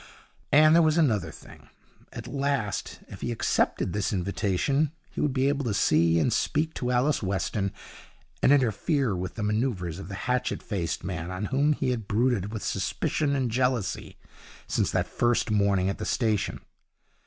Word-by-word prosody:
And 155 +2 +7
there 170 - +6
was 155 0 +3
another 110 - +2
thing. - - -14 0.4
At - - -8
last, 140 -7 -2
if - - -11
he - - -2
accepted 105 -5 0
this 105 -1 -1
invitation, 100 - 0 0.2
he - - -4
would 150 - +1
be 130 +1 +1
able 140 0 0
to 105 -4 -1
see 85 -2 +3
and 115 +8 +2
speak 155 +6 0
to 125 - -3
Alice 125 +4 +2
Weston, 100 +1 -1 0.7
and - - +4
interfere 130 - +2
with 90 +1 -5
the 110 - -3
manoeuvres 105 -6 -1
of - - -8
the 95 - -6
hatchet 125 0 -1
faced 90 -6 -3
man, 90 -2 -4
on 95 +3 -3
whom 145 +3 +3
he 130 - -1
had 115 -5 -3
brooded 110 -2 +1
with 110 -2 -5
suspicion 145 -2 -1
and 130 -4 0
jealousy 125 -4 -1 0.5
since - - 0
that - - 0
first 120 -2 0
morning 100 -3 +2
at 100 - -2
the - - -3
station. 110 -5 0
115 Hz, 170 wpm, -27 LUFS, 95-135 Hz, 0.7 s, And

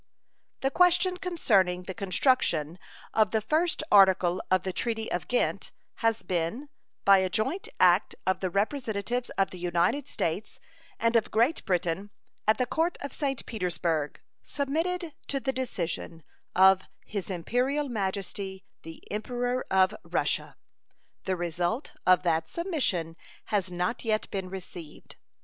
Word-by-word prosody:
The 270 - +1
question 360 +2 +4
concerning 200 - +1
the 190 - -6
construction 185 - +1 0.3
of 215 -3 +4
the 220 - +1
first 310 +9 +1
article 190 -3 +5
of 185 -1 +3
the 185 - -3
treaty 225 +2 -2
of 175 - -2
Ghent 245 - 0 0.3
has 225 -1 +1
been, 185 - -2 0.4
by 195 -1 +7
a 190 0 +1
joint 265 - -1
act 180 +2 +4
of 185 -1 +1
the 185 - -1
representatives 225 +3 -1
of 195 - +2
the 185 - -8
United 180 +11 +1
States 195 - -3 0.4
and 230 +1 +1
of 225 - +3
Great 235 +9 +2
Britain 180 +2 -1 0.4
at 215 - +5
the 250 - +1
Court 325 +8 0
of 280 -1 -5
St. 275 -4 -2
Petersburg, 170 -7 -2 0.2
submitted 325 +4 -2
to 275 - -1
the 265 0 -1
decision 170 -9 -3 0.3
of 190 0 +7 0.2
His 200 -3 -4
Imperial 250 - 0
Majesty 195 -3 -3 0.2
the 165 0 -11
Emperor 245 +4 -2
of 190 +1 +4
Russia. - - -1 0.7
The 190 - 0
result 175 - -2
of 185 0 +6
that 165 -2 +1
submission 240 - -1 0.4
has 190 -3 +1
not 180 +6 -2
yet 220 -2 -1
been 190 -2 -3
received. 180 -4 -9
200 Hz, 140 wpm, -28 LUFS, 180-255 Hz, 0.7 s, by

